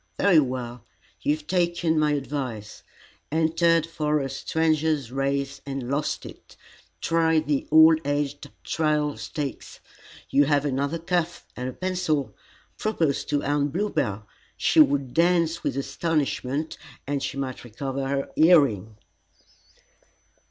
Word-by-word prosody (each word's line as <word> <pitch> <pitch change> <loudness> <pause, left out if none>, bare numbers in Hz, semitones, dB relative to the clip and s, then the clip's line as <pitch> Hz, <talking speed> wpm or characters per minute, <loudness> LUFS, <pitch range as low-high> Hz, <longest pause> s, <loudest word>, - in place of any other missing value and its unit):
Very 185 -5 +5
well; 125 -3 -3 0.4
you 145 - +2
have 155 -1 -13
taken 170 -2 +1
my 150 -1 +2
advice, 135 -7 -4 0.5
entered 165 +1 +2
for 150 -2 -1
a 135 -2 -3
Stranger's 155 -2 0
Race 135 0 -2
and 135 -2 -5
lost 145 +2 -2
it. - - -13 0.4
Try 165 -1 +2
the 150 -3 -1
All 160 +1 +8
aged 145 0 -2
Trial 150 -2 0
Stakes. 115 +5 -6 0.5
You 145 +1 +5
have 145 0 +2
another 140 +3 -1
cuff, 175 0 -2
and 125 +1 -4
a - - -7
pencil. 180 -6 -1 0.4
Propose 165 -10 0
to 145 -1 -1
Aunt 145 0 0
Bluebell; 110 - -1 0.3
she - - +2
would 140 -4 +4
dance 170 -1 +2
with - - -2
astonishment, 145 0 -2 0.3
and 140 0 -2
she - - -4
might 130 -2 -4
recover 135 +3 -4
her 140 0 -2
hearing." 130 - +4
145 Hz, 125 wpm, -25 LUFS, 135-160 Hz, 0.5 s, All